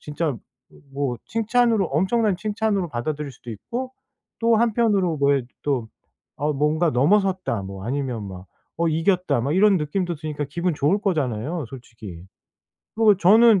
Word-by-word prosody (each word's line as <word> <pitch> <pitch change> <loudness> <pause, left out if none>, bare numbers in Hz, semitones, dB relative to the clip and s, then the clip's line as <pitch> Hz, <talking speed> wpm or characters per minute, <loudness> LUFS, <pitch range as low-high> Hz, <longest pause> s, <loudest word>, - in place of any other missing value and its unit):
진짜 150 -1 -2 0.6
뭐 140 -3 -1
칭찬으로, 230 -1 +2
엄청난 190 - +1
칭찬으로 210 -3 -1
받아들일 145 +3 -4
수도 120 0 -11
있고 245 - -5 0.5
또 230 0 +4
한편으로 210 -7 +2
왜 140 -1 +3 0.2
또 130 -6 -1 0.5
'어 150 +2 0
뭔가 155 +4 +1
넘어섰다.' 185 - +1
뭐 95 0 -8
아니면 125 -5 -3
막 95 0 -10 0.3
'어 170 0 +2
이겼다.' 170 -2 +1
막 140 +6 -1
이런 200 +1 +5
느낌도 175 +4 -2
드니까 150 -1 -4
기분 170 +1 -1
좋을 155 +9 +1
거잖아요 150 - -1
솔직히. 110 -9 -10 0.7
그리고 215 -3 +5
저는 210 +3 +6
160 Hz, 310 characters per minute, -23 LUFS, 135-205 Hz, 0.7 s, 저는